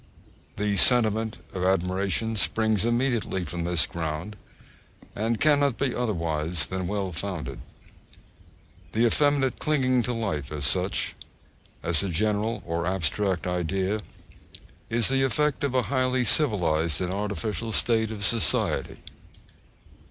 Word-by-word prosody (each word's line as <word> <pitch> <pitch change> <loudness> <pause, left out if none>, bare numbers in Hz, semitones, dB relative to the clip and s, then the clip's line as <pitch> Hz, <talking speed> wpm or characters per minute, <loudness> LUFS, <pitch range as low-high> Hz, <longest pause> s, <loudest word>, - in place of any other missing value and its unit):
The 100 0 -1
sentiment 110 -2 +4 0.2
of 90 - -3
admiration 95 +4 0
springs 110 0 +2
immediately 120 -5 0
from 85 -1 -4
this 85 -3 +4
ground, 80 +5 -5 0.8
and 115 +2 -1
cannot 145 -4 +3
be 135 -2 -1
otherwise 85 -7 -2
than 95 -1 -4
well 100 -2 -2
founded.(3) 90 -1 -2 1.4
The 115 +2 +2
effeminate 140 +1 +2
clinging 130 -5 +1
to 125 +1 -3
life 95 - -3
as 75 -2 -2
such, 90 +5 +1 0.7
as 85 -2 0
a 100 - -3
general 105 +5 -1
or 85 0 -2
abstract 95 0 -1
idea, 95 +4 -1 0.9
is 115 0 +3
the 135 0 +1
effect 145 +2 +1
of 135 -2 -1
a 130 - +3
highly 130 -2 0
civilised 85 - +2
and 90 -1 -2
artificial 105 +1 -3
state 110 0 +2
of 105 -2 -3
society. 110 -7 +1
105 Hz, 120 wpm, -26 LUFS, 90-120 Hz, 1.4 s, sentiment